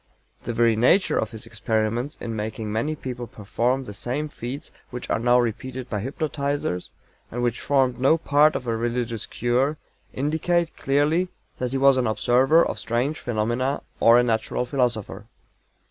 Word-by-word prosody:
The 120 - -2
very 115 -1 +3
nature 130 - +3
of 110 - -1
his 115 +1 -8
experiments 115 +4 -1
in 115 -1 -4
making 110 0 -4
many 145 +8 -1
people 125 -4 -6
perform 120 +5 -1
the 105 - -8
same 135 +9 -3
feats 130 +1 -6 0.2
which 125 0 -6
are - - +1
now 120 +1 +4
repeated 125 +2 -3
by 105 -3 -1
hypnotizers, 140 - -2 0.4
and 120 +1 -3
which 120 -1 0
formed 130 -3 +2
no 135 +5 +4
part 150 -1 +4
of 125 - -3
a 115 -1 0
religious 115 -1 -2
cure, 130 +5 0 0.3
indicate 160 +4 0
clearly 150 +6 +1 0.3
that 125 - -1
he 135 - -1
was 135 0 +5
an 125 -2 +1
observer 130 +8 +4
of - - -3
strange 120 +6 -1
phenomena 120 +4 -1 0.2
or 115 +1 +7
a 120 - +5
natural 115 +1 0
philosopher. 120 -6 -1
125 Hz, 160 wpm, -24 LUFS, 115-140 Hz, 0.4 s, or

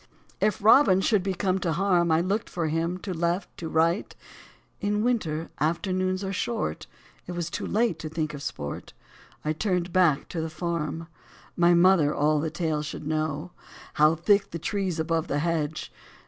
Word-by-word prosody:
If 210 -1 0
Robin 215 -4 +6
should 205 +1 +2
be 190 0 -2
come 190 0 0
to 170 -3 -1
harm 180 -1 +2
1 160 -1 +3
I - - +2
looked 200 +5 -1
for 165 -3 -2
him 165 +3 -1
to 190 - -4
left, 170 +3 -1
to 165 - -5
right: 165 +4 +1 0.6
In 210 +1 0
winter, 170 -10 -1
afternoons 185 +5 0
are 195 0 -3
short, 115 - -2 0.4
It 180 - -5
was 170 -1 -3
too - - -3
late 220 -6 +1
to 155 - -5
think 155 -1 -3
of 145 - -7
sport; 70 - -6 0.5
I 155 - +1
turned 180 0 -1
back 175 -7 +3
to 165 - -3
the 160 - -3
farm. 165 -1 -3 0.5
My 175 0 +5
mother 170 -4 +4
all 150 +1 +2
the 160 +2 -1
tale 160 -2 -1
should 150 0 -6
know. 155 +2 -2 0.4
How 155 +2 +4
thick 200 +4 +2
the 170 - -5
trees 185 -1 -2
above 165 +1 0
the 145 - -1
hedge 155 -1 -2
170 Hz, 180 wpm, -26 LUFS, 155-185 Hz, 0.6 s, Robin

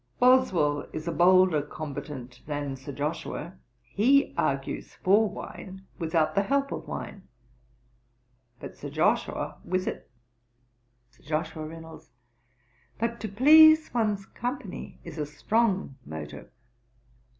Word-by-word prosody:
'Boswell 190 - +3
is 155 +1 -5
a - - 0
bolder 185 -3 +5
combatant 140 -4 -7
than 145 -2 -3
Sir 135 +2 -9
Joshua: 150 +4 -4 0.3
he 240 - +3
argues - - -2
for 205 +3 +3
wine 190 0 -9
without 160 -2 +1
the 200 - +3
help 275 +6 0
of - - -5
wine; 195 - -7 1.3
but - - -9
Sir - - -7
Joshua - - 0
with 185 0 -1
it.' - - -5 1.0
SIR 125 - -27
JOSHUA 155 +1 -3
REYNOLDS. 160 0 -11 0.9
'But 230 +1 -2
to 215 - -4
please 315 +8 +7
one's 210 -4 0
company 245 -4 -6
is 165 -2 -8
a 150 - -1
strong 195 - 0
motive.' 75 0 -8
185 Hz, 115 wpm, -27 LUFS, 150-225 Hz, 1.3 s, please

